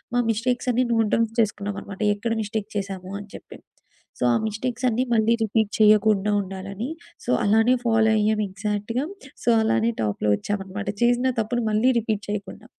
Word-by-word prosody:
మా -, -, +3 dB
మిస్టేక్సన్నీ 245 Hz, +2 st, +1 dB
note 225 Hz, -2 st, +2 dB
downs 225 Hz, -1 st, 0 dB
చేసుకున్నానమాట 200 Hz, -2 st, -2 dB
ఎక్కడ 225 Hz, +3 st, -3 dB
mistake 210 Hz, 0 st, -4 dB
చేశాము 195 Hz, -2 st, -4 dB
అని 205 Hz, -, -10 dB
జెప్పి. -, -, -11 dB, 0.6 s
సో, -, -, -1 dB
ఆ -, -, +3 dB
మిస్టేక్సన్నీ 250 Hz, +2 st, -1 dB
మళ్ళీ 225 Hz, +1 st, +3 dB
రిపీట్ 220 Hz, -1 st, 0 dB
చెయ్యకుండా 210 Hz, -1 st, +4 dB
ఉండాలనీ, 195 Hz, +5 st, -6 dB, 0.4 s
సో, -, -, 0 dB
అలానే 225 Hz, +4 st, +4 dB
ఫాలో. 225 Hz, -1 st, +3 dB
అయ్యామెగ్జాక్ట్‌గా. 210 Hz, +3 st, -1 dB, 0.4 s
సో, -, -, +1 dB
అలానే 230 Hz, +1 st, +2 dB
టాప్‌లో 105 Hz, 0 st, -1 dB
ఒచ్చామనమాట, 200 Hz, 0 st, -4 dB
చేసిన 245 Hz, +2 st, +3 dB
తప్పును 240 Hz, +2 st, -2 dB
మళ్ళీ 230 Hz, +5 st, +3 dB
రిపీట్ 215 Hz, -2 st, -2 dB
చెయకుండా. 205 Hz, -1 st, -5 dB
215 Hz, 140 wpm, -24 LUFS, 200-230 Hz, 0.6 s, చెయ్యకుండా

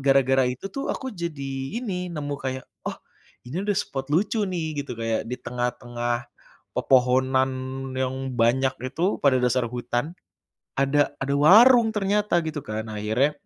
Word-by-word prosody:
gara-gara 135 Hz, -1 st, +4 dB
itu 125 Hz, +8 st, -6 dB
tuh 275 Hz, -, -4 dB
aku 260 Hz, -3 st, -3 dB
jadi 140 Hz, -3 st, -4 dB
ini, 185 Hz, -7 st, -3 dB
nemu 145 Hz, -4 st, -4 dB
kayak, 130 Hz, 0 st, -4 dB, 0.2 s
"Oh, -, -, -5 dB, 0.5 s
ini 135 Hz, +9 st, -4 dB
ada 205 Hz, -, +2 dB
spot 135 Hz, -5 st, -3 dB
lucu 200 Hz, +6 st, +1 dB
nih, 160 Hz, -5 st, -2 dB
gitu 140 Hz, -4 st, -6 dB
kayak, 115 Hz, 0 st, -2 dB
di 125 Hz, -, -3 dB
tengah-tengah 120 Hz, -1 st, -3 dB, 0.5 s
pepohonan 130 Hz, +1 st, +3 dB, 0.4 s
yang 130 Hz, 0 st, -2 dB
banyak 130 Hz, +3 st, +2 dB, 0.2 s
itu, 175 Hz, +6 st, +1 dB
pada 135 Hz, -3 st, +5 dB
dasar 125 Hz, 0 st, +2 dB
hutan, 120 Hz, +4 st, -2 dB, 0.6 s
ada 145 Hz, +2 st, +2 dB
ada 140 Hz, +1 st, -1 dB
warung" 225 Hz, -, +7 dB
ternyata 205 Hz, -1 st, +1 dB
gitu 155 Hz, -2 st, -3 dB
kan, 110 Hz, -4 st, -4 dB
nah 110 Hz, -1 st, -6 dB
akhirnya 110 Hz, +8 st, +2 dB
135 Hz, 145 wpm, -25 LUFS, 125-170 Hz, 0.6 s, warung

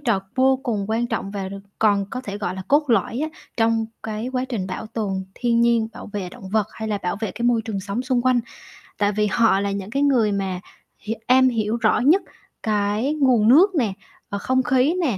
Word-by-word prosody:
trò 230 Hz, -9 st, +1 dB
vô 265 Hz, +1 st, +4 dB
cùng 215 Hz, -5 st, -1 dB
quan 230 Hz, +2 st, +1 dB
trọng 220 Hz, -4 st, -3 dB
và 195 Hz, -2 st, -4 dB
được 195 Hz, -, -7 dB, 0.2 s
còn 205 Hz, -2 st, +3 dB
có 255 Hz, -, -4 dB
thể 205 Hz, -5 st, -6 dB
gọi 185 Hz, -3 st, -3 dB
là 190 Hz, -, -6 dB
cốt 290 Hz, -1 st, +3 dB
lõi 230 Hz, +1 st, +1 dB
á 315 Hz, -, -1 dB, 0.3 s
trong 225 Hz, -1 st, +2 dB, 0.2 s
cái 220 Hz, +2 st, -4 dB
quá 255 Hz, 0 st, 0 dB
trình 215 Hz, -8 st, -3 dB
bảo 190 Hz, -, -5 dB
tồn 200 Hz, -4 st, -3 dB
thiên 235 Hz, -1 st, +1 dB
nhiên, 235 Hz, -2 st, +3 dB
bảo -, -, -9 dB
vệ 195 Hz, -3 st, -3 dB
động 190 Hz, -, -11 dB
vật, 210 Hz, +1 st, +1 dB
hay 220 Hz, 0 st, -5 dB
là 210 Hz, -1 st, -1 dB
bảo 180 Hz, +2 st, -1 dB
vệ 220 Hz, -, -2 dB
cái 235 Hz, -, -5 dB
môi 235 Hz, -2 st, +3 dB
trường 210 Hz, -4 st, -4 dB
sống 200 Hz, +5 st, -3 dB
xung 255 Hz, -2 st, 0 dB
quanh. 255 Hz, -1 st, +3 dB, 0.6 s
Tại 205 Hz, 0 st, +2 dB
vì 210 Hz, +1 st, +1 dB
họ 225 Hz, -3 st, +4 dB
là 200 Hz, 0 st, -1 dB
những 195 Hz, 0 st, -4 dB
cái 275 Hz, +5 st, 0 dB
người 245 Hz, -7 st, +3 dB
mà 195 Hz, -2 st, -2 dB, 0.5 s
h -, -, -1 dB, 0.2 s
am 260 Hz, +1 st, +6 dB
hiểu 225 Hz, -1 st, -1 dB
rõ 225 Hz, -2 st, +2 dB
nhất 315 Hz, +10 st, +4 dB, 0.4 s
cái 210 Hz, +5 st, 0 dB
nguồn 255 Hz, -8 st, +3 dB
nước 350 Hz, -, +6 dB
nè 230 Hz, -, +1 dB, 0.4 s
hoặc 200 Hz, -, -3 dB
không 260 Hz, +4 st, +1 dB
khí 275 Hz, +4 st, +2 dB
nè, 255 Hz, -, 0 dB
225 Hz, 230 wpm, -22 LUFS, 205-255 Hz, 0.6 s, am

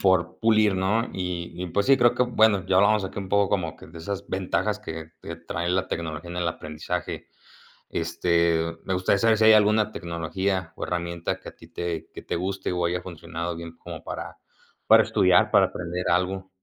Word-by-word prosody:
Por 95 Hz, -3 st, +2 dB
pulir, 110 Hz, -3 st, +4 dB
¿no?, 105 Hz, +6 st, +1 dB
y 90 Hz, -2 st, -4 dB
y -, -, -3 dB
pues 100 Hz, +6 st, 0 dB
sí, 135 Hz, -, +6 dB
creo 120 Hz, -2 st, +4 dB
que, -, -, +2 dB
bueno, 110 Hz, -5 st, +3 dB
ya 95 Hz, -, +2 dB
hablamos 100 Hz, +1 st, +4 dB
aquí 95 Hz, -, -6 dB
un 95 Hz, -, -5 dB
poco 100 Hz, 0 st, +3 dB
como 85 Hz, -5 st, -1 dB
que -, -, -13 dB
de 85 Hz, +1 st, -11 dB
esas 100 Hz, +4 st, -5 dB
ventajas 95 Hz, +2 st, -1 dB
que 80 Hz, -5 st, -8 dB
que 85 Hz, -, -7 dB
trae 85 Hz, +1 st, -4 dB
la 95 Hz, +1 st, +1 dB
tecnología 80 Hz, 0 st, -5 dB
en 90 Hz, -, -6 dB
el 85 Hz, -1 st, 0 dB
aprendizaje, 80 Hz, +3 st, -5 dB, 0.6 s
este, 85 Hz, 0 st, +1 dB
me 95 Hz, -, -1 dB
gustaría 95 Hz, +2 st, +2 dB
saber 115 Hz, +1 st, +4 dB
si, 110 Hz, -, +3 dB
¿hay 110 Hz, -, +9 dB
alguna 105 Hz, 0 st, +4 dB
tecnología 85 Hz, +2 st, -2 dB
o -, -, -4 dB
herramienta 85 Hz, -1 st, -3 dB
que -, -, -11 dB
a -, -, -23 dB
ti 80 Hz, -, -16 dB
te 85 Hz, -1 st, -4 dB
que -, -, -9 dB
te -, -, -3 dB
guste 95 Hz, +1 st, -2 dB
o 90 Hz, -1 st, 0 dB
haya 90 Hz, +1 st, -2 dB
funcionado 85 Hz, 0 st, -5 dB
bien 85 Hz, 0 st, -9 dB
como 85 Hz, -3 st, -9 dB
para -, -, -7 dB, 0.5 s
para -, -, +7 dB
estudiar, -, -, +3 dB
para -, -, +5 dB
aprender 90 Hz, +1 st, -4 dB
algo? 95 Hz, +2 st, 0 dB
90 Hz, 200 wpm, -25 LUFS, 85-100 Hz, 0.6 s, hay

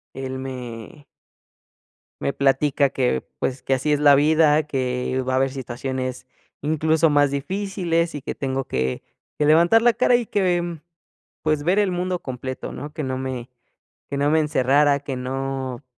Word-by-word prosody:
Él 130 Hz, 0 st, -5 dB
me 130 Hz, +2 st, -8 dB, 1.2 s
me 140 Hz, -, 0 dB
platica 140 Hz, +1 st, +2 dB
que, 125 Hz, -, 0 dB
pues, 130 Hz, 0 st, -2 dB
que 135 Hz, -, 0 dB
así 135 Hz, +3 st, 0 dB
es 145 Hz, -, +2 dB
la 145 Hz, -1 st, +7 dB
vida, 155 Hz, +1 st, +4 dB
que 130 Hz, -2 st, -2 dB
va 130 Hz, -, 0 dB
a -, -, +2 dB
haber 135 Hz, 0 st, +1 dB
situaciones 130 Hz, 0 st, -4 dB, 0.4 s
incluso 155 Hz, +2 st, +2 dB
más 145 Hz, -1 st, +4 dB
difíciles 170 Hz, +1 st, -1 dB
y 145 Hz, -, -5 dB
que -, -, -4 dB
tengo 135 Hz, -1 st, -2 dB
que 65 Hz, -, -2 dB, 0.3 s
que 150 Hz, -, +1 dB
levantar 170 Hz, +9 st, +5 dB
la 240 Hz, -, +5 dB
cara 240 Hz, +1 st, +3 dB
y 240 Hz, -, +1 dB
que, 180 Hz, -4 st, +1 dB
mm, 170 Hz, -2 st, -5 dB, 0.6 s
pues, 155 Hz, -2 st, +1 dB
ver 180 Hz, +6 st, +2 dB
el 200 Hz, -3 st, +2 dB
mundo 180 Hz, 0 st, -1 dB
completo, 130 Hz, -1 st, -6 dB
¿no? 145 Hz, +1 st, -7 dB
Que 155 Hz, -1 st, -4 dB
no 130 Hz, -1 st, -2 dB
me 130 Hz, -2 st, -4 dB, 0.6 s
que 140 Hz, -, -3 dB
no 145 Hz, +1 st, +2 dB
me 160 Hz, -, +4 dB
encerrara, 145 Hz, 0 st, +3 dB
que 135 Hz, -3 st, -5 dB
no 135 Hz, 0 st, -4 dB
140 Hz, 170 wpm, -22 LUFS, 130-160 Hz, 1.2 s, la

